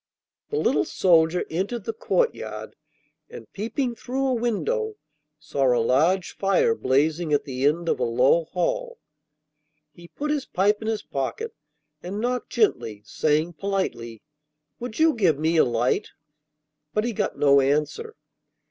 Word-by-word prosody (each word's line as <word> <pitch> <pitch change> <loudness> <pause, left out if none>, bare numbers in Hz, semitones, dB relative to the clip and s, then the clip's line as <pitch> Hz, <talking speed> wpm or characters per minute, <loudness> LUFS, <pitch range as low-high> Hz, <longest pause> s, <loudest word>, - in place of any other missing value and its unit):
The 440 - -2
little - - +2
soldier 170 -1 +3
entered 195 +7 -2
the 225 - -3
courtyard, 475 - -2 0.5
and, 480 - -10
peeping 235 +5 -2
through 260 +3 -3
a - - +2
window, 425 - -1 0.4
saw 140 -5 +1
a - - +2
large 155 +11 +2
fire 200 - +2
blazing 155 - +1
at 145 -1 +2
the 135 -1 0
end 170 +3 0
of - - +1
a - - 0
low 130 +8 +3
hall. 485 - -2 1.0
He 170 0 -14
put 295 +10 -4
his 290 -3 -2
pipe 205 +3 +1
in 220 - -5
his 220 -1 -1
pocket 130 -4 -4 0.5
and 190 +4 -5
knocked 245 +2 -2
gently, 115 - 0
saying 155 - 0
politely: 150 - -3 0.6
'Would 235 -2 -6
you 320 0 +4
give 180 - +2
me 160 +3 +1
a - - +7
light?' 120 0 0 0.9
But 215 - +2
he 240 0 -2
got - - -2
no 140 -1 +5
answer. 150 - -1
180 Hz, 150 wpm, -24 LUFS, 145-240 Hz, 1.0 s, a